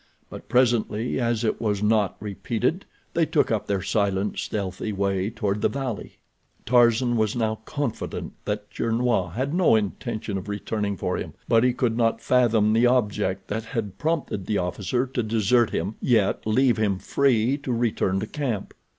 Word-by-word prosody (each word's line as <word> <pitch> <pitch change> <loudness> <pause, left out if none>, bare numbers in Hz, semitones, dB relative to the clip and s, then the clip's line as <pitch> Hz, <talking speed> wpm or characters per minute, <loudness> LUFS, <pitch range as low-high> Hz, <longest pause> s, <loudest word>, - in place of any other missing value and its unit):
But - - -10
presently, 120 -1 +1
as 120 -2 0
it 110 - -1
was 105 -2 0
not 105 -2 +2
repeated, 115 - -2 0.3
they 165 -2 +2
took 155 -6 +2
up 110 -2 -1
their 100 -2 -1
silent, 100 -1 0
stealthy 100 +1 -3
way 100 0 0
toward 105 -2 -2
the - - +3
valley. 130 -5 -5 0.5
Tarzan 120 0 +4
was 110 0 +1
now 110 -2 -1
confident 145 -7 -4
that 105 0 -3
Gernois 115 -6 0
had 130 +7 -2
no 175 -9 +4
intention 105 0 -2
of 100 - -9
returning 105 0 -2
for - - -1
him, - - -6
but 115 0 +4
he 125 - +4
could 120 -2 0
not 115 -1 +1
fathom 115 -4 +3
the 115 +2 +4
object 105 -6 0
that 110 +2 -3
had 110 -6 -4
prompted 155 - -2
the 105 - +1
officer 100 +8 -1
to 125 -1 -2
desert 115 +1 +2
him, 95 +6 -2
yet 110 -4 +2
leave 125 +3 +3
him 105 -3 +1
free 130 +2 +2
to 140 -2 -4
return 115 -5 0
to - - -2
camp. 120 -5 -3
110 Hz, 165 wpm, -25 LUFS, 105-125 Hz, 0.5 s, Tarzan